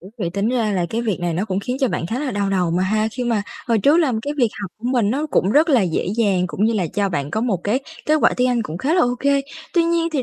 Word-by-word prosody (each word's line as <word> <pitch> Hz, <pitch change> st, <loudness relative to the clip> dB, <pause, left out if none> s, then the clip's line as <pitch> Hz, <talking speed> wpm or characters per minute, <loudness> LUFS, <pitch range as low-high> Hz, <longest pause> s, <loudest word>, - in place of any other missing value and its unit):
Ủa, 185 Hz, -, -12 dB
vậy 175 Hz, -5 st, -2 dB
tính 200 Hz, +4 st, -1 dB
ra 235 Hz, -4 st, 0 dB
là 180 Hz, -3 st, 0 dB
cái 230 Hz, +1 st, -1 dB
việc 215 Hz, -7 st, -2 dB
này 175 Hz, -1 st, -1 dB
nó 185 Hz, +5 st, -1 dB
cũng 195 Hz, -2 st, -2 dB
khiến 250 Hz, +5 st, -3 dB
cho 265 Hz, -, +3 dB
bạn 170 Hz, -, -2 dB
khá 225 Hz, +8 st, -3 dB
là 285 Hz, -1 st, -2 dB
đau 200 Hz, -3 st, -1 dB
đầu 180 Hz, -3 st, +1 dB
mà 175 Hz, +2 st, +1 dB
ha, 215 Hz, +3 st, +1 dB
khi 250 Hz, +1 st, -3 dB
mà 230 Hz, -4 st, 0 dB, 0.3 s
hồi 230 Hz, -2 st, +3 dB
trước 285 Hz, +9 st, +4 dB
là 315 Hz, -7 st, +2 dB
cái 290 Hz, -, -3 dB
việc 245 Hz, -5 st, +3 dB
học 195 Hz, -, -5 dB
của 220 Hz, -, -16 dB
mình 230 Hz, -5 st, +2 dB
nó 285 Hz, +6 st, -1 dB
cũng 195 Hz, -9 st, +1 dB
rất 310 Hz, +5 st, +4 dB
là 260 Hz, -8 st, +4 dB
dễ 175 Hz, -4 st, -1 dB
dàng 195 Hz, -6 st, +2 dB
cũng 195 Hz, +3 st, -1 dB
như 225 Hz, -, +3 dB
là 195 Hz, -6 st, 0 dB
cho 205 Hz, -1 st, +1 dB
bạn 145 Hz, -5 st, -3 dB
có 220 Hz, -, -1 dB
một 230 Hz, -4 st, +1 dB
cái 225 Hz, +6 st, +1 dB, 0.3 s
kết 305 Hz, -, +4 dB
quả -, -, +4 dB
tiếng 250 Hz, 0 st, +2 dB
Anh 245 Hz, -2 st, +1 dB
cũng 170 Hz, -5 st, -6 dB
khá 290 Hz, -, 0 dB
là 360 Hz, -, +4 dB
ô 245 Hz, 0 st, +1 dB
kê. 280 Hz, 0 st, +3 dB, 0.3 s
Tuy 340 Hz, -1 st, +4 dB
nhiên 335 Hz, 0 st, +1 dB
thì 280 Hz, -4 st, 0 dB
220 Hz, 325 wpm, -20 LUFS, 190-260 Hz, 0.3 s, trước